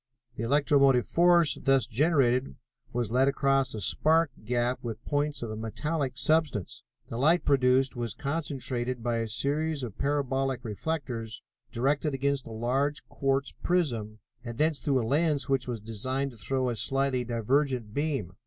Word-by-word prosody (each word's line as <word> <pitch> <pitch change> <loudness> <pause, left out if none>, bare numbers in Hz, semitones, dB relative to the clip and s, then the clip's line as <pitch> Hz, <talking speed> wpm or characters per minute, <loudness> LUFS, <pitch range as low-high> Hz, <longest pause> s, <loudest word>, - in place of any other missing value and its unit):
The - - -6
electromotive 140 0 +3
force 170 -2 +4
thus 135 -2 +3
generated 130 -1 +1 0.4
was 120 -3 -2
led 130 +3 +3
across 135 -2 +1
a - - -4
spark 160 - +2
gap 120 +2 0
with 115 -1 -6
points 145 -2 -1
of 115 - -4
a - - -4
metallic 130 +5 -3
substance. 150 - 0 0.3
The 115 - -5
light 160 +7 +3
produced 130 -1 +3
was 120 -3 -4
concentrated 130 -5 -3
by 120 -1 0
a 115 0 -1
series 140 +6 -1
of 115 -5 -7
parabolic 135 -2 0
reflectors, 115 -1 -4 0.3
directed 140 +4 0
against 140 0 -1
a - - -8
large 130 +6 -1
quartz 135 0 0
prism, 120 -12 0 0.3
and 120 -1 -7
thence 155 0 +1
through 135 -4 +1
a - - -3
lens 145 +2 +1
which 135 -3 0
was 120 -3 -3
designed 130 +6 -3
to 120 - -15
throw 130 +5 -1
a 120 - -2
slightly 135 +2 0
divergent 120 0 0
beam. 140 - -2
135 Hz, 155 wpm, -28 LUFS, 120-145 Hz, 0.4 s, force